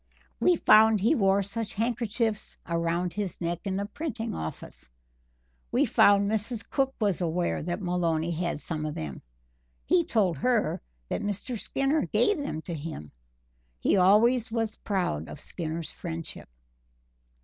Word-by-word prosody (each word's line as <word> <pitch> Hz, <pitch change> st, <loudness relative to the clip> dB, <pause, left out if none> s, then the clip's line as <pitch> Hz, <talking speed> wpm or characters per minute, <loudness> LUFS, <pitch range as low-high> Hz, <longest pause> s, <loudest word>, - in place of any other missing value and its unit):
We 360 Hz, -, +4 dB
found 220 Hz, -6 st, +6 dB
he 220 Hz, +10 st, +3 dB
wore 195 Hz, -6 st, +3 dB
such 210 Hz, +2 st, -5 dB
handkerchiefs 230 Hz, -1 st, -1 dB
around 170 Hz, +1 st, -1 dB
his 205 Hz, -4 st, -3 dB
neck 170 Hz, 0 st, -2 dB
in 190 Hz, -1 st, -1 dB
the 200 Hz, -, -1 dB
printing 235 Hz, -1 st, -4 dB
office. 80 Hz, -5 st, -7 dB, 0.8 s
We -, -, +3 dB
found 200 Hz, 0 st, +5 dB
Mrs. 220 Hz, +2 st, -2 dB
Cook 270 Hz, -1 st, 0 dB
was 200 Hz, -5 st, +1 dB
aware 175 Hz, +1 st, 0 dB
that 175 Hz, +5 st, -3 dB
Maloney 170 Hz, -2 st, 0 dB
had 170 Hz, -1 st, -2 dB
some 155 Hz, +1 st, -4 dB
of 150 Hz, -, -5 dB
them 75 Hz, -4 st, -5 dB, 0.6 s
he 175 Hz, -, +4 dB
told 190 Hz, -, +1 dB
her 235 Hz, -, +1 dB, 0.3 s
that -, -, -2 dB
Mr. 205 Hz, +4 st, -3 dB
Skinner 275 Hz, +7 st, 0 dB
gave 415 Hz, -6 st, +2 dB
them 220 Hz, -, -4 dB
to 175 Hz, -, -5 dB
him. 150 Hz, -, -6 dB, 0.7 s
He -, -, +2 dB
always 220 Hz, +6 st, +4 dB
was 225 Hz, -2 st, -1 dB
proud 180 Hz, -, -2 dB
of -, -, -8 dB
Skinner's 160 Hz, -1 st, -4 dB
friendship." 165 Hz, -, -6 dB
200 Hz, 145 wpm, -28 LUFS, 170-225 Hz, 0.8 s, found